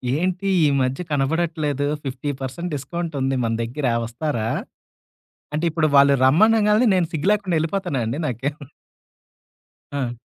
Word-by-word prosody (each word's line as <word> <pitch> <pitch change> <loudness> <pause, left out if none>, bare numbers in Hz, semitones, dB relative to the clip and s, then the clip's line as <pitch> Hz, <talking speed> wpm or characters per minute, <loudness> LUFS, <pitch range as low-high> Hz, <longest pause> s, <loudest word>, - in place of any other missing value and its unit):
ఏంటి 185 +4 -1 0.2
ఈ - - +5
మధ్య 130 +4 -1
కనబడట్లేదు. 150 0 0 0.2
50% 135 +4 -4
డిస్కౌంట్ 170 +3 -4
ఉంది 135 0 +1
మన 115 -1 0
దగ్గర 125 +5 -4 0.2
వస్తారా? 120 -1 -3 1.1
అంటే 155 +3 -1
ఇప్పుడు 160 -1 +1
వాళ్ళు 140 0 +6
రమ్మనంగానే 210 - +4
నేను 180 -2 +2
సిగ్గు 160 +3 -1
లేకుండా 200 -5 0
వెళ్ళిపోతుాన్నా 165 -3 -1
అండి 115 +6 -2
నాకే 130 +2 -2 1.4
ఆ! 125 -4 -3
150 Hz, 120 wpm, -22 LUFS, 135-175 Hz, 1.4 s, వాళ్ళు